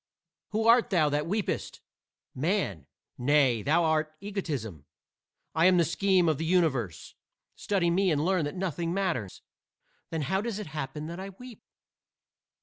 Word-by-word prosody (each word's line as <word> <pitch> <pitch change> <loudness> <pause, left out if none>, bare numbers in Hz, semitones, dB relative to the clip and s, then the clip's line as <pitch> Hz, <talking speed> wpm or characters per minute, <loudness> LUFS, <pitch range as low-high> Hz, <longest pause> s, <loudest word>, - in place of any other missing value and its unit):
"Who 220 +1 -1
art 235 +1 +5
thou 165 -7 +3
that 145 +2 -1
weepest?" 205 +3 -2 0.5
"Man." 130 - -1 0.3
"Nay, 130 -3 +3
thou 160 +8 +2
art 155 -1 0
Egotism. 140 - -5 0.7
I 160 +3 +4
am 185 -1 +5
the 170 - +4
Scheme 185 +1 +2
of 155 -3 +1
the - - -1
Universe. 130 - -1 0.4
Study 185 -4 0
me 190 +2 +2
and 150 -1 +1
learn 185 -4 +1
that 145 - -5
nothing 175 -2 -2
matters." 170 - -2 0.7
"Then 160 -2 -2
how 190 +6 0
does 225 -2 -3
it 210 - -5
happen 150 -1 -5
that 170 +3 -6
I 195 +1 -6
weep?" 235 +4 -12
165 Hz, 150 wpm, -28 LUFS, 145-190 Hz, 0.7 s, art